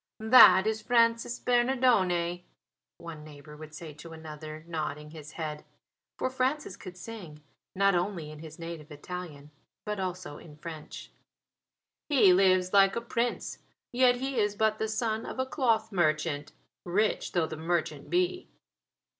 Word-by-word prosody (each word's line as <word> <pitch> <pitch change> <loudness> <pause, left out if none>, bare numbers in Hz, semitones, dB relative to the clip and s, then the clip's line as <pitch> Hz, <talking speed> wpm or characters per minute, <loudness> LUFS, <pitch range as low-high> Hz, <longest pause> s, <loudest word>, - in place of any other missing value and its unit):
"That 190 -6 +9
is 220 0 -1
Francis 230 0 +2
Bernardone," 240 -9 +2 0.6
one 165 -3 -9
neighbour 150 0 -12
would 155 0 -11
say 155 -1 -8
to 165 +3 -11
another, 155 -1 -9
nodding 150 -2 -4
his 155 -2 -11
head, 155 -2 -5 0.5
for - - 0
Francis 260 -4 -1
could 185 -2 -10
sing, 175 -7 -9 0.3
not 195 +1 +4
only 175 -3 -2
in 155 - -11
his 160 0 -10
native 165 -2 -8
Italian, 150 -2 -8 0.3
but 210 -1 -3
also 180 -5 -5
in 150 -3 -14
French. 155 0 -9 1.0
"He 250 -11 +6
lives 185 0 +3
like 195 -1 +5
a - - 0
prince; 235 0 -2 0.3
yet 245 0 +4
he 265 0 -2
is 205 -1 +1
but 215 +1 +1
the 220 - 0
son 220 0 -1
of - - -7
a 260 - 0
cloth 230 -5 0
merchant, 155 -4 0 0.3
rich 205 +5 0
though 175 -3 +2
the 160 - -6
merchant 160 -3 -2
be." 360 +1 0
180 Hz, 145 wpm, -29 LUFS, 155-220 Hz, 1.0 s, That